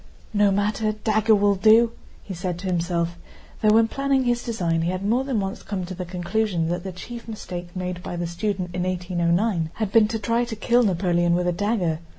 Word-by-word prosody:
"No 205 -1 +4
matter, 210 +2 0
the - - -15
dagger 220 0 +3
will 205 0 +3
do," 220 +4 +5 0.3
he 195 - -7
said 180 -1 -3
to 185 - -8
himself, 170 -1 -1 0.4
though 215 - +4
when 225 0 +5
planning 275 +2 +1
his 240 -1 +1
design 175 -8 -1
he 165 - 0
had 185 +2 -3
more 240 +5 +2
than 265 -5 -1
once 195 0 -4
come 190 -3 -4
to 185 - -6
the 180 0 -5
conclusion 180 -1 -1
that 175 0 -2
the 190 - -5
chief 235 +6 -9
mistake 180 -5 -7
made 180 -1 -4
by 175 - -5
the 175 0 -2
student 180 +1 -3
in 180 - -2
1809 175 0 0
had 215 -3 -2
been 220 -1 +5
to 225 - -2
try 230 +3 0
to 235 -2 -5
kill 240 +3 +3
Napoleon 175 -4 +2
with 180 0 0
a - - +3
dagger. 180 -4 0
195 Hz, 215 wpm, -24 LUFS, 175-220 Hz, 0.4 s, do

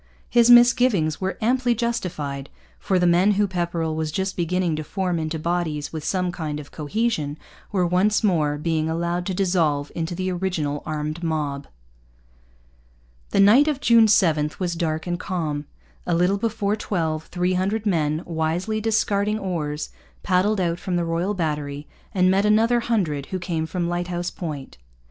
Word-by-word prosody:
His 235 0 +5
misgivings 240 - +5
were 190 +1 -2
amply 245 +1 +2
justified; 165 - -3 0.3
for 190 - 0
the 180 - +2
men 180 +4 +4
whom 205 +1 +2
Pepperrell 170 -3 -2
was 160 -1 -2
just 190 +3 -2
beginning 175 -1 0
to 155 - -3
form 180 0 -2
into 160 0 -2
bodies 160 -3 -2
with 155 -2 -5
some 180 +2 0
kind 155 -4 -4
of 145 - -11
cohesion 155 -2 -2 0.3
were 185 -4 +1
once 190 +6 +2
more 155 -7 +2
being 160 0 -1
allowed 170 +2 -2
to 190 - -2
dissolve 165 -7 +1
into 165 +1 -3
the 185 +1 -2
original 175 -6 -2
armed 155 +1 -3
mob. 150 -4 -2 1.6
The - - 0
night 235 +9 +6
of 295 -3 0
June 230 -4 +5
7 160 -7 +3
was 180 -2 -2
dark 160 -2 -2
and 175 0 -2
calm. 155 -7 -3 0.4
A 170 - +2
little 180 +4 +2
before 215 -2 0
twelve 160 -7 -2
three 180 +1 0
hundred 200 +4 -1
men, 155 -5 0
wisely 175 +6 -1
discarding 210 -1 +1
oars, 155 -7 -3 0.3
paddled 195 +3 +2
out 170 -1 0
from 180 0 -3
the 175 -1 0
Royal 170 +5 -1
Battery 150 -4 -3 0.3
and 185 -1 +3
met 195 +1 +3
another 225 +3 +4
hundred 180 -13 -1
who 190 - -3
came 170 -3 -3
from 175 0 -2
Lighthouse 175 0 -2
Point. 150 - -7
175 Hz, 160 wpm, -23 LUFS, 155-200 Hz, 1.6 s, night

